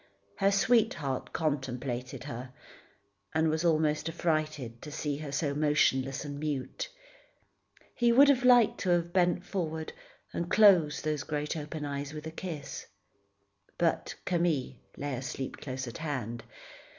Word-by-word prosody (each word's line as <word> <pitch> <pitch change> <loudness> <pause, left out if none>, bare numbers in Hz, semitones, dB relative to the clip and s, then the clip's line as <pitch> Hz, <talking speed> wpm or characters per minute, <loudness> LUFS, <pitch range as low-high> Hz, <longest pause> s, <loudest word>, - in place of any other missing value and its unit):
Her 195 - +4
sweetheart 200 - +1
contemplated 130 -5 -2
her, 130 -2 -7 0.8
and 160 0 +3
was 160 +1 -1
almost 155 -1 +2
affrighted 155 -8 -2
to 150 - -8
see 145 -1 -2
her 150 -1 -6
so 140 0 0
motionless 145 -2 +2
and 145 -1 -5
mute. 145 -4 -3 1.0
He 240 -1 +3
would 275 +4 +7
have 265 -3 +4
liked 245 -3 +6
to 185 - -1
have 175 -1 +2
bent 180 -1 +2
forward, 160 -5 -3 0.4
and 170 0 -2
closed 185 -9 +5
those 150 -2 -1
great 150 +2 -2
open 150 0 -5
eyes 140 +1 -4
with 150 0 -7
a 160 - -5
kiss. 160 -4 -6 0.9
But - - 0
Camille 170 -8 +1 0.2
lay 145 0 -3
asleep 130 +1 -4
close 130 -1 -5
at 120 - -7
hand. 120 -7 -4
150 Hz, 140 wpm, -30 LUFS, 140-170 Hz, 1.0 s, would